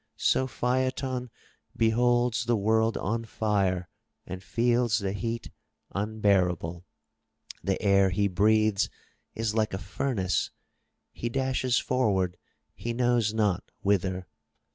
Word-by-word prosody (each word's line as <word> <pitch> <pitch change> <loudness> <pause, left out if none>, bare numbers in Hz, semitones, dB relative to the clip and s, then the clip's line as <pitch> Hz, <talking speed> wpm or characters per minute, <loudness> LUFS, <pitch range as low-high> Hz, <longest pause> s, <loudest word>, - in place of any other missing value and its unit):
So 130 - +2
Phaeton 130 0 -1 0.5
beholds 120 +1 +2
the 120 0 +2
world 110 +2 +2
on 115 +4 -1
fire, 100 -5 0 0.4
and 95 +1 -6
feels 120 +1 +2
the 100 -3 -2
heat 115 +2 -4 0.4
unbearable. 95 -5 0 0.8
The 95 +2 0
air 100 -1 +5
he 100 +2 +1
breathes 105 +2 +3 0.5
is 115 -1 -1
like 110 -3 0
a - - -2
furnace. 95 -1 -1 0.6
He 120 - -4
dashes 130 -1 0
forward 95 -8 +1 0.2
— 75 - -51
he 115 +9 -4
knows 120 -3 +2
not 105 -5 0
whither. 95 -2 +1
110 Hz, 115 wpm, -28 LUFS, 95-120 Hz, 0.8 s, air